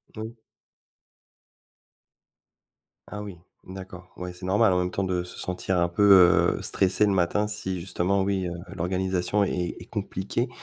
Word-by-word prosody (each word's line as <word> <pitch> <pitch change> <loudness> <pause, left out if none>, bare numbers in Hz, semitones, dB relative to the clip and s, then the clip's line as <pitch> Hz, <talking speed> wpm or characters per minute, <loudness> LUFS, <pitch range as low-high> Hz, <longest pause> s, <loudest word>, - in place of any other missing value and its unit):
Moui. 110 +2 -7 2.7
Ah 105 - -6
oui. 100 -4 -8 0.3
D'accord. 95 -1 -10
Ouais, 90 0 -6
c'est 90 +1 -9
normal 100 +2 +3
en 90 - +2
même 90 0 0
temps 100 - -2
de 90 -2 -1
se 90 - -10
sentir 90 0 -2
un 85 - +2
peu, 90 -1 +5
heu, - - -6
stressée 95 +2 +2
le 100 - +2
matin. 95 +3 +1
Si 95 -3 -3
justement, 95 +2 0
oui, 95 -2 -1
heu, - - -4 0.2
l'organisation 95 +2 0
est 90 -3 -2
est - - -11
compliquée. 105 +3 -3
95 Hz, 150 wpm, -26 LUFS, 90-100 Hz, 2.7 s, peu